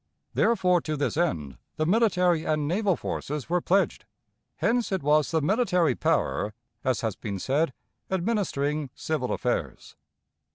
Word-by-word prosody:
Therefore, 185 -6 +3
to 155 -1 -3
this 145 - -1
end 75 - -1 0.2
the 155 - 0
military 180 -4 +3
and 155 -2 0
naval 190 +3 +1
forces 150 -1 -4
were 180 0 +2
pledged. 195 +4 +1 0.5
Hence 235 -1 +1
it 190 -5 -1
was 150 +1 +3
the 160 -1 +1
military 180 - +2
power, 105 -1 0 0.3
as 130 -4 +1
has 110 -4 -1
been 100 -2 -5
said, 140 - +1 0.4
administering 170 - -1
civil 150 -6 -2
affairs. - - -2
160 Hz, 135 wpm, -27 LUFS, 145-190 Hz, 0.5 s, Therefore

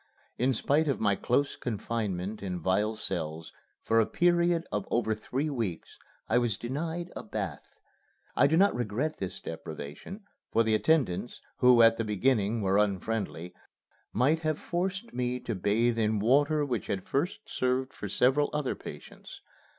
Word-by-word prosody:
In 130 +2 +3
spite 145 +7 +1
of 140 - 0
my 100 -2 +2
close 135 +7 0
confinement 105 -3 -3
in 90 -3 -3
vile 105 +5 +1
cells, 80 -5 -4 0.3
for 115 - +3
a 110 - +3
period 175 -1 +2
of 105 -2 -2
over 115 -2 +1
three 130 +8 -3
weeks 110 - -4 0.3
I 120 - +3
was 120 -3 0
denied 165 +8 -4
a - - -4
bath. - - -6 0.6
I - - +5
do 160 +3 +2
not 200 +3 +5
regret 120 +6 -2
this 95 -1 -4
deprivation, 80 - -8 0.3
for 115 - +4
the 110 -1 +1
attendants, 120 - +1 0.2
who 125 -2 +6
at 115 0 +6
the 115 - 0
beginning 110 0 +1
were 95 +1 +3
unfriendly, 100 -3 -1 0.6
might 140 +8 +2
have 155 -1 0
forced 190 +6 -3
me 125 0 -1
to 115 - -3
bathe 115 +4 +1
in 110 -1 +2
water 145 +7 +3
which 125 -6 -3
had 95 -2 -3
first 160 +10 -1
served 130 +1 -1
for 105 - -6
several 135 +8 +3
other 150 -3 -1
patients. - - -11
120 Hz, 160 wpm, -29 LUFS, 105-145 Hz, 0.6 s, who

